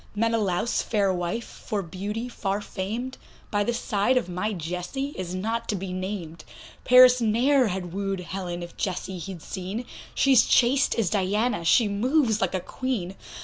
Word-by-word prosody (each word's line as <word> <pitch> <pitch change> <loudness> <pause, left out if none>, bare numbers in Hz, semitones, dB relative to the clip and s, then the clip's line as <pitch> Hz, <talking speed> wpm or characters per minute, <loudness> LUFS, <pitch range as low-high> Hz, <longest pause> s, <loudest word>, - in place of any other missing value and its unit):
Menalaus' 225 -2 +1
fair 200 -4 +1
wife, 180 +6 -2
for 205 -2 -4
beauty 205 +7 -4
far 200 -4 -2
famed, 220 +6 -5 0.3
By 205 -1 +2
the 240 - 0
side 230 +1 +1
of 250 - 0
my 180 +4 -2
Jessie 180 - -4
is 185 -1 -4
not 225 +5 -2
to 210 - +1
be 190 -1 -4
named; 185 -4 -5 0.4
Paris 250 0 +7
ne'er 245 +4 +3
had 180 -3 -4
woo'd 195 -1 -2
Helen, 175 -1 -5
if 175 - -10
Jessie 185 -1 -3
he'd 175 -2 -7
seen, 195 +5 -5 0.3
She's 265 -4 +5
chaste 265 +4 +4
as 215 -7 0
Diana, 210 +1 +1
she 215 +7 +4
moves 225 +2 +1
like 190 -1 0
a - - +1
Queen. 205 -3 -3
205 Hz, 160 wpm, -26 LUFS, 185-235 Hz, 0.4 s, Paris